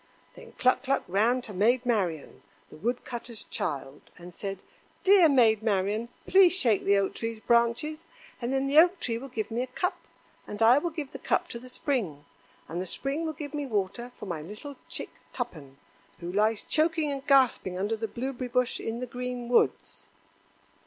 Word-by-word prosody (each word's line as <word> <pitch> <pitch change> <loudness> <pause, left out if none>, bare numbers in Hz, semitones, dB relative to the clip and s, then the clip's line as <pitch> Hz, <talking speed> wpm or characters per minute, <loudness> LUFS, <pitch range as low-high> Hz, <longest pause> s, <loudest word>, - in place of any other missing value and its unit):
Then - - -14
Cluck 255 0 +2
cluck 275 0 0
ran 230 +7 +2
to 210 - -6
Maid 235 +6 +2
Marian, 185 -11 -1 0.3
the - - -11
wood 235 +10 -2
cutter's 235 -2 -5
child, 140 0 -4 0.2
and 175 0 -11
said: 195 +2 -5 0.5
"Dear 380 -4 +7
Maid 230 -6 +4
Marian, 210 +2 0 0.2
please 380 -2 +6
shake 230 - +2
the 200 0 +4
Oak 195 -1 0
tree's 230 -1 -4
branches; 235 +8 +1 0.4
and 240 +1 -2
then 270 0 +1
the 280 +3 +6
Oak 350 +2 +5
tree 230 -6 -2
will 270 - -8
give 225 -5 -4
me 235 +2 -1
a 255 - -2
cup, 360 +9 -1 0.5
and 205 - -7
I 240 +5 +7
will 345 - -2
give 305 -4 -6
the - - -8
cup - - 0
to 235 - -6
the 255 +1 -11
Spring, 205 - -2 0.4
and 170 +4 -4
the 185 - -4
Spring 280 - -2
will 315 - -3
give 295 -1 -7
me 290 -2 -3
water 220 +2 -2
for - - -8
my 170 -5 -4
little 210 - -9
chick - - -5 0.2
Tuppen, 155 - -6 0.4
who 170 0 -5
lies 215 +1 +2
choking 315 -1 +1
and 275 -1 -4
gasping 255 -9 +3
under 205 +4 0
the 225 0 -3
blueberry 255 +3 -4
bush 250 0 0
in 230 +2 -4
the - - -2
green 250 0 -5
woods." 100 - +1
235 Hz, 190 wpm, -28 LUFS, 200-270 Hz, 0.5 s, Dear